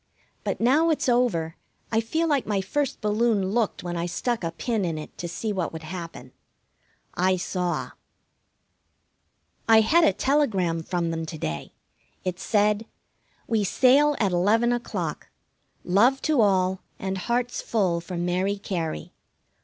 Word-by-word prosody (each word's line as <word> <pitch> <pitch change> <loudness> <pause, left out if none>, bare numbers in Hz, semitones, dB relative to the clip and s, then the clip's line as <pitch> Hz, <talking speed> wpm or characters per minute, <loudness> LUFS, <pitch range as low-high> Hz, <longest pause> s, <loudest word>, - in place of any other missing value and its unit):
But - - -2
now 285 +8 +4
it's 310 - 0
over 235 -11 +1 0.3
I 225 0 +2
feel 320 +9 -1
like 285 -5 +1
my 205 -2 +1
first 275 +9 -2
balloon 210 -2 +1
looked 225 -1 0
when 175 -1 -4
I 170 0 -2
stuck 235 +4 -2
a 165 - 0
pin 220 +5 -2
in 165 -3 -2
it 155 - -8
to 175 - -3
see 210 +5 -3
what 185 -4 -2
would 160 0 -8
happen. 165 -6 -8 0.8
I 185 +1 +2
saw. 180 -1 -2 1.8
I 220 0 +8
had 325 +10 +4
a 320 - +5
telegram 200 - +1
from 170 0 -2
them 165 0 -3
to 160 - -6
day. 75 - -5 0.5
It 185 -1 -3
said: 210 +1 +1 0.6
We 225 -2 +1
sail 275 +8 +4
at 200 -4 +2
eleven 220 +7 +3
o'clock. 240 0 -4 0.5
Love 235 +9 +3
to 300 -6 +3
all, 190 -2 +2 0.2
and 190 0 -3
hearts 240 +5 -1
full 185 -7 0
for 175 +1 -6
Mary 180 +3 0
Cary. 165 - -4
200 Hz, 150 wpm, -25 LUFS, 175-235 Hz, 1.8 s, I